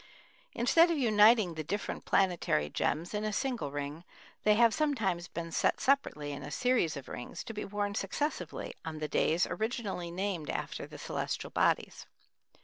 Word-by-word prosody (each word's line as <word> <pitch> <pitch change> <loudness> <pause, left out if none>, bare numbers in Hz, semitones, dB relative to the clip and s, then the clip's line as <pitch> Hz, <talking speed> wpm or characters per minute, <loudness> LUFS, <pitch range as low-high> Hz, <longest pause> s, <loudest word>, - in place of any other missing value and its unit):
Instead 330 +9 +5
of 335 - +1
uniting 215 -5 +5
the 160 -1 -4
different 200 +7 -4
planetary 175 - +2
gems 170 +6 -1
in 210 0 -1
a 215 - -1
single 245 - -1
ring, 145 +3 -5 0.4
they 210 0 +5
have 230 0 +5
sometimes 215 - 0
been 165 0 -6
set - - +1
separately 205 - +1
in 140 0 -6
a 145 - -7
series 235 - +1
of 135 - -8
rings 120 - -6
to 225 - -7
be 210 - -4
worn 205 0 -2
successively 290 - -3
on 160 -1 -5
the 155 0 -3
days 160 +3 +2
originally 215 -6 -3
named 180 -3 -3
after - - -4
the - - -10
celestial - - -3
bodies. - - +1
195 Hz, 165 wpm, -31 LUFS, 160-230 Hz, 0.4 s, Instead